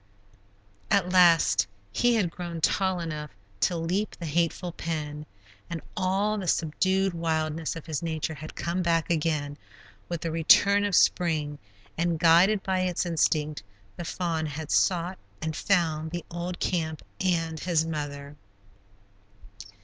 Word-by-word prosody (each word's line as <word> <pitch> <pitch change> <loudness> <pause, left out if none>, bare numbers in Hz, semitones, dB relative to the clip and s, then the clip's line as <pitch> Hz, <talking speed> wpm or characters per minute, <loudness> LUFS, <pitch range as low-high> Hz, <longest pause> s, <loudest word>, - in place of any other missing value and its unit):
At 195 -4 +2
last 165 - +5 0.2
he 245 - +3
had 190 -7 +1
grown 170 -1 -6
tall 190 +2 +1
enough 155 -3 -5 0.3
to 175 - +1
leap 180 +6 -1
the 170 - -6
hateful 170 +3 0
pen, 150 -3 -5 0.4
and 170 - -3 0.2
all 200 +3 0
the 190 - -5
subdued 185 +4 +1
wildness 160 -1 -1
of 165 - -8
his 155 -3 -3
nature 160 -1 -2
had 155 +1 -9
come 175 +2 -2
back 170 -1 +1
again 150 -3 -1 0.5
with 170 -2 -3
the 165 - -2
return 200 +5 +5
of 200 -3 +1
spring, 155 -4 +2 0.4
and 170 -1 +1
guided 175 +5 +5
by 190 -1 0
its 185 -1 0
instinct, 155 -3 0 0.3
the 175 - -6
fawn 165 -2 -2
had 150 +1 -6
sought 180 0 +1 0.2
and 160 0 -3
found 160 -4 +1
the 175 +1 -5
old 175 +1 -4
camp 160 -4 -2 0.2
and 165 -4 0
his 165 -2 +1
mother. 145 -2 -5
165 Hz, 140 wpm, -27 LUFS, 155-180 Hz, 0.5 s, last